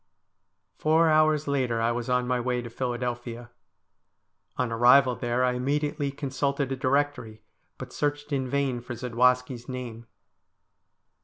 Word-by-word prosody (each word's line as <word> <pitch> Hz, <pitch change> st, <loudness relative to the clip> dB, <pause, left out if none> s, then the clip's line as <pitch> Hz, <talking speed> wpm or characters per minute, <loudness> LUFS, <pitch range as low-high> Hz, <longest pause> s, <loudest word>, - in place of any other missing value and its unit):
Four 160 Hz, +1 st, +3 dB
hours 155 Hz, -1 st, +3 dB
later 130 Hz, -5 st, 0 dB
I 115 Hz, +1 st, +1 dB
was 120 Hz, +1 st, -3 dB
on 125 Hz, 0 st, +2 dB
my 125 Hz, 0 st, 0 dB
way 125 Hz, 0 st, -1 dB
to 120 Hz, -, -8 dB
Philadelphia. 120 Hz, -1 st, -4 dB, 1.1 s
On 125 Hz, -2 st, -1 dB
arrival 125 Hz, +2 st, +5 dB
there 120 Hz, +1 st, -1 dB
I 125 Hz, -, +3 dB
immediately 140 Hz, +3 st, -1 dB
consulted 140 Hz, 0 st, -2 dB
a -, -, 0 dB
directory, 130 Hz, -5 st, -1 dB, 0.3 s
but -, -, -9 dB
searched 145 Hz, 0 st, -2 dB
in 130 Hz, -2 st, -1 dB
vain 135 Hz, -3 st, -1 dB
for 120 Hz, 0 st, -7 dB
Zadwaski' 125 Hz, +2 st, +1 dB
s 120 Hz, -, -16 dB
name. 120 Hz, -3 st, -7 dB
125 Hz, 140 wpm, -26 LUFS, 120-140 Hz, 1.1 s, arrival